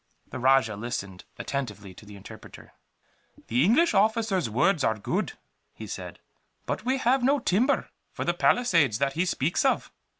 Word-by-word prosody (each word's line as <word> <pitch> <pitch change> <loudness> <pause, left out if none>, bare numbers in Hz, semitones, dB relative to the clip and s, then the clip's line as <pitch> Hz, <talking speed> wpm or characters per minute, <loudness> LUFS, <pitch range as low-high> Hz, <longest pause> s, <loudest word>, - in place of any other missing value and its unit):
The - - -5
rajah 130 -4 +3
listened 100 -5 -6
attentively 105 -9 -5
to 105 - -15
the 105 - -11
interpreter. 100 - -13 0.8
"The 125 +4 +2
English 250 - +3
officer's 210 - +1
words 150 - +2
are 110 - +1
good," 180 - -2 0.4
he - - -8
said, - - -7 0.5
"but - - -3
we 260 +2 0
have 260 +1 +2
no 275 +4 +3
timber 245 +3 0 0.2
for - - -5
the - - +1
palisades 165 - +2
that 135 +2 0
he 170 +5 0
speaks 165 -2 0
of." 270 - 0
160 Hz, 160 wpm, -26 LUFS, -, 0.8 s, rajah